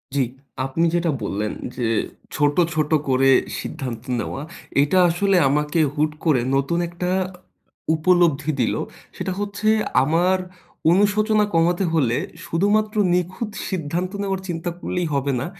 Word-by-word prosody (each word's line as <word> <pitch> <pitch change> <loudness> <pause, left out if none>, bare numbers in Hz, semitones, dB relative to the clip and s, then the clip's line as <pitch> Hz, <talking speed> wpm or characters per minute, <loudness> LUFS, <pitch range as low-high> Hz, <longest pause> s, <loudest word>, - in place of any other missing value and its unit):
জ্বি, 140 - +3 0.4
আপনি 165 +6 0
যেটা 170 -2 +1
বললেন 105 +1 -2 0.2
যে 120 -3 -1 0.5
ছোট, 145 -1 +2 0.2
ছোট 155 -1 0 0.2
করে 135 +1 +4 0.3
সিদ্ধান্ত 125 -7 -5 0.2
নেওয়া 135 +5 -4 0.4
এটা 145 +6 +2
আসলে 190 +2 +2
আমাকে 150 +3 +1 0.2
হুট 150 +1 +1
করে 145 -7 +3
নতুন 140 +5 +1
একটা 175 +1 -3 0.2
অ - - -10 0.7
উপলব্ধি 160 -3 +3
দিল। 115 - +1 0.4
সেটা 190 - -3
হচ্ছে 205 +1 -3 0.4
আমার 175 +6 +2 0.5
অনুশোচনা 210 +3 +3
কমাতে 175 +3 +2
হলে 125 -7 +2 0.3
শুধু 170 +3 0
মাত্র 215 0 0 0.2
নিখুঁত 185 +5 -1 0.2
সিদ্ধান্ত 180 +1 -2
নেওয়ার 195 -1 -2
চিন্তা 175 0 -3
করলেই 180 -2 -2
হবে 140 0 0
না। 130 - -3
165 Hz, 135 wpm, -22 LUFS, 145-185 Hz, 0.7 s, করে